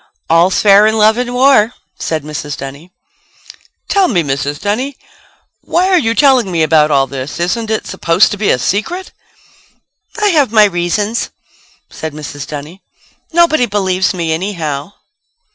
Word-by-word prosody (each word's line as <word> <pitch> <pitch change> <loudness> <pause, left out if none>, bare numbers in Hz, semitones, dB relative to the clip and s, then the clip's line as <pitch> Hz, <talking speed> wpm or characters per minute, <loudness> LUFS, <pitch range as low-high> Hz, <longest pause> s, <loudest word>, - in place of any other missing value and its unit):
"All's 170 +3 +3
fair 205 0 +6
in 220 0 0
love 220 +2 +3
and 245 0 -2
war," 245 -3 +3 0.2
said 155 -2 -3
Mrs. 150 -1 -6
Dunny. 140 +6 -9 1.0
"Tell 390 -2 +2
me, 175 - +1
Mrs. 140 +1 -3
Dunny. 245 +7 -2 0.7
Why 360 +3 +1
are 370 -2 +4
you 230 -4 -1
telling 260 -8 +3
me 165 -2 +1
about 155 -1 +3
all 140 -2 +3
this? 135 +3 -7
Isn't 215 +6 -2
it 220 - -2
supposed 165 +6 +2
to 205 - -3
be 210 0 0
a - - +3
secret?" 220 - -3 1.1
"I 420 -1 +2
have 290 - +2
my 215 -2 +6
reasons," 205 +4 -1 0.6
said 160 -2 -6
Mrs. 145 -2 -8
Dunny. 150 +6 -8 0.5
"Nobody 320 -6 +3
believes 190 -3 0
me 170 -4 -2
anyhow." 160 -3 -4
195 Hz, 150 wpm, -14 LUFS, 155-230 Hz, 1.1 s, fair